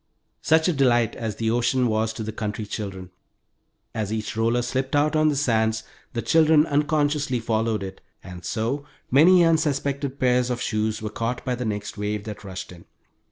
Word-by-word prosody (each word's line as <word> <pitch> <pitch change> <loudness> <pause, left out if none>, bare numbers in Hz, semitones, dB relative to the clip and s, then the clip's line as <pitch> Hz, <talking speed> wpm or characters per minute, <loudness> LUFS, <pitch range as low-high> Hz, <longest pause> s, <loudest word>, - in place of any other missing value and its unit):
Such 160 +1 +3
a 180 - +2
delight 120 -5 +2
as 110 -2 -4
the 110 -1 -1
ocean 120 +2 +2
was 110 -1 +1
to 110 - -5
the 110 - -4
country 110 0 -4
children! 95 -3 -6 0.8
As 110 -2 -3
each 110 -2 -3
roller 115 +2 +1
slipped 130 +3 -2
out 150 +1 +2
on 155 0 +4
the 145 - 0
sands 110 -5 +1 0.3
the 115 -2 -2
children 155 +4 +5
unconsciously 145 -3 +1
followed 110 -2 -1
it, 95 0 -8 0.2
and 90 -1 -10
so, 120 +6 -2 0.3
many 170 +6 +6
unsuspected 140 -4 0
pairs 125 -1 +2
of 125 -1 -2
shoes 110 -1 -1
were 105 - -3
caught 115 +2 -3
by 130 - 0
the 125 0 -3
next 105 -1 -4
wave 105 0 -2
that 105 -1 -8
washed 95 -2 -7
in. 85 -2 -14
115 Hz, 180 wpm, -24 LUFS, 110-140 Hz, 0.8 s, many